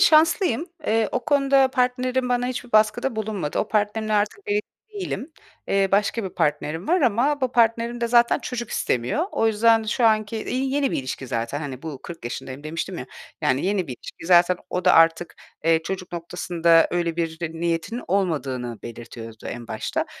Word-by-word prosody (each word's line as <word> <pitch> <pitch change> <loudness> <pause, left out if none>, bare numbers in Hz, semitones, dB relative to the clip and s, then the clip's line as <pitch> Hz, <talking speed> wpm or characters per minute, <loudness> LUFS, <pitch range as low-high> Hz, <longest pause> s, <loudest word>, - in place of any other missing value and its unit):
şanslıyım. 330 - +4 0.2
Eee, 220 0 +2
o 250 - -2
konuda 275 -2 +4
partnerim 255 0 0
bana 245 0 +1
hiçbir 250 -1 -5
baskıda 215 +3 +3
bulunmadı. 210 -8 -2
O 215 - 0
partnerimle 215 +1 0
artık 210 - +1
evli 415 0 +1 0.3
değilim. 355 -6 -4 0.4
Eee, 195 0 +2
başka 210 +2 +2
bir - - -2
partnerim 155 +4 -1
var 360 +2 +3
ama 265 +4 +2
bu 255 -1 0
partnerim 235 +1 +2
de 235 - 0
zaten 235 0 +4
çocuk 240 -3 -5
istemiyor. 125 - 0
O 225 - +1
yüzden 225 +1 +4
şu 220 +3 0
anki, 215 0 +2
iii, 265 +1 -1
yeni 285 -2 +1
bir - - -1
ilişki 130 0 -5
zaten, 115 +5 -2
hani, 135 -4 -6
bu 155 -5 -7
40 170 -7 -9
yaşındayım 130 +3 -6
demiştim 165 +4 -4
ya 125 - -6 0.3
yani, 130 +6 +1
yeni 195 -3 0
bir 130 - -5
ilişki. 165 - -11
Zaten 180 0 +5
o 180 -1 -2
da - - +6
artık, 165 +1 +4 0.3
eee, 165 0 +3
çocuk 185 +1 -5
noktasında 170 -1 +2
öyle 170 -2 -1
bir 165 -1 -2 0.2
niyetinin 170 +8 -2
olmadığını 140 - -1
belirtiyordu 115 -1 -9
en 120 -1 -7
başta. - - -2
205 Hz, 175 wpm, -23 LUFS, 165-245 Hz, 0.4 s, da